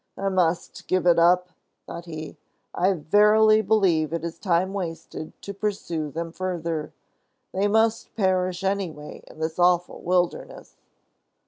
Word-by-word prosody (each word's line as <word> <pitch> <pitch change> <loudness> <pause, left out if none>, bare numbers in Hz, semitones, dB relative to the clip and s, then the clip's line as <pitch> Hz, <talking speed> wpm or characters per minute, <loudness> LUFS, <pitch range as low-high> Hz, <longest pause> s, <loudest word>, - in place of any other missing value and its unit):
"I 195 - -1
must 180 -3 -1
give 185 -2 +1
it 175 -1 +5
up," 180 +2 +4 0.4
thought 170 - -8
he. 155 -2 -7 0.4
"I 185 +2 +2
verily 210 +6 +4
believe 190 -8 +2
it 165 -1 -2
is 165 0 -6
time 185 0 +1
wasted 165 -4 -6
to 200 - -6
pursue 190 -7 -3
them 165 +3 -5
further. 170 -4 -3 0.6
They 195 +2 +1
must 220 +2 +1
perish 185 -2 0
anyway 185 -7 -3
in - - -15
this 160 +2 -4
awful 175 0 +2
wilderness." 180 0 -2
180 Hz, 135 wpm, -24 LUFS, 165-195 Hz, 0.6 s, it